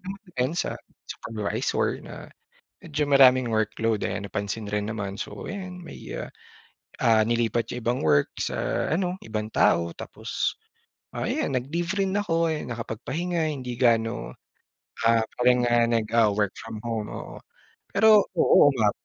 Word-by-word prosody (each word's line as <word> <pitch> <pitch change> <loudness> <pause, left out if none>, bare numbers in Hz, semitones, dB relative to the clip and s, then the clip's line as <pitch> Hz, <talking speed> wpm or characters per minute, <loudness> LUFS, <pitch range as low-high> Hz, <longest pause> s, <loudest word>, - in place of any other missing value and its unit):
naman 195 +1 -7
din 130 +1 0
sa - - 0 0.3
supervisor 110 -2 -2
na - - -10 0.7
medyo 150 -2 -1
maraming 130 -3 +6
workload, 110 0 0
ayan, 100 0 -3
napansin 100 +1 -4
rin 105 0 -1
naman. 100 -2 -4
So, 105 -1 -6
ayan, 185 -2 -6
may, 170 - -10 0.2
ah, - - -5 0.7
ah, 110 -2 +4
nilipat 115 0 0
yung 125 - -5
ibang 120 +2 0
work 75 -2 +4
sa - - -1
ano, 180 +1 -1
ibang 110 -1 -3
tao 85 -5 +3
tapos, - - -3 0.7
ah, - - -1
ayan, - - -1
nag-leave 165 +7 -2
rin 195 -1 +1
ako, 170 -5 +1
ayan, 150 - -5
nakapagpahinga, 155 +9 -2
hindi 130 -4 -5
gaano, 115 -1 +1 0.8
ah, 115 -1 +3 0.2
parang, 125 0 +4
ah, 120 -1 +3
nag, 115 -2 +1
ah, 115 -2 +5
work 105 -2 +1
from - - -7
home, 110 -2 -2
oo. - - -8 0.5
Pero, 215 0 +6 0.2
oo, 145 - +6
uma 110 -7 +2
120 Hz, 150 wpm, -26 LUFS, 110-155 Hz, 0.8 s, maraming